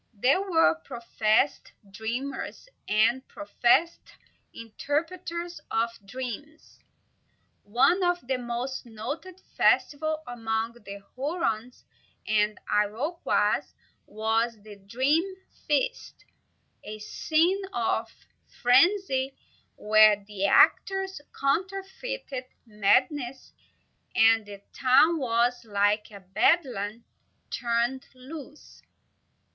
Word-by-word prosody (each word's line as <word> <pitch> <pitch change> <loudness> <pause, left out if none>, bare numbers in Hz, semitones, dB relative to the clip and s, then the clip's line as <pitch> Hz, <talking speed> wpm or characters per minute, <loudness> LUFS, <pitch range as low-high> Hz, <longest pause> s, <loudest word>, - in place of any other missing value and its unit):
There 260 - +3
were 325 - +2
professed 235 - 0 0.2
dreamers, 245 - -5 0.2
and 230 +5 +2
professed 240 +11 +1 0.4
interpreters 340 +9 -4
of 230 +1 0 0.2
dreams. 260 +6 -8 0.8
One 260 - +2
of 355 -4 0
the 260 +1 -1
most 245 +2 -4
noted 280 +12 -7 0.2
festivals 310 +1 +2
among 225 -1 -3
the 200 -4 -11
Hurons 255 -5 -3 0.4
and 210 0 +1
Iroquois 225 - +1 0.5
was 225 +2 -1
the 210 -1 -11
Dream 260 - +1 0.4
Feast, - - -1 0.6
a 215 - -7
scene 325 - +1
of 225 -1 -1 0.5
frenzy, 265 0 +3 0.4
where 215 -1 +5
the 200 -1 -2
actors 385 - +3 0.2
counterfeited 385 - -3 0.2
madness, 245 +5 0 0.6
and 225 -1 +4
the 200 -1 -10
town 280 +6 +4
was 245 -1 +1
like 205 0 +1
a 200 -2 -12
bedlam 215 - +1 0.5
turned 240 +2 -1
loose. 285 +3 -11
245 Hz, 85 wpm, -27 LUFS, 215-310 Hz, 0.8 s, where